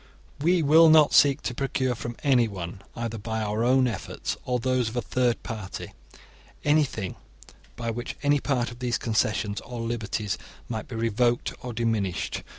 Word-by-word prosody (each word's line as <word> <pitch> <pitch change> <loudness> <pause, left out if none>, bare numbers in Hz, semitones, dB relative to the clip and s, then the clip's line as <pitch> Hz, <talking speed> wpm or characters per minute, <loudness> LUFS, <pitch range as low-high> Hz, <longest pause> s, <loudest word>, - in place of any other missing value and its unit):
* - - -29
We 170 +2 +3
will 160 +3 +7
not 155 -2 +6
seek 145 +1 +5
to 120 - -2
procure 130 0 0
from 120 0 -6
anyone, 105 - +1
either 115 -1 -4
by 110 +1 -3
our 105 +2 -1
own 130 +1 +4
efforts 110 -5 -4
or 125 -1 +1
those 125 -1 +1
of 110 - -9
a 120 - +1
third 125 +1 0
party, 105 -4 -6 0.7
anything 145 - +1 0.6
by 115 -1 -3
which 120 +2 -5
any 145 0 +4
part 125 -4 0
of 120 - -11
these 125 -2 0
concessions 110 -2 0
or 120 -1 -7
liberties 110 -3 -2 0.3
might 110 -2 -4
be 120 - -7
revoked 115 +2 +1
or 125 - -5
diminished. 110 -5 -1
120 Hz, 165 wpm, -26 LUFS, 110-130 Hz, 0.7 s, will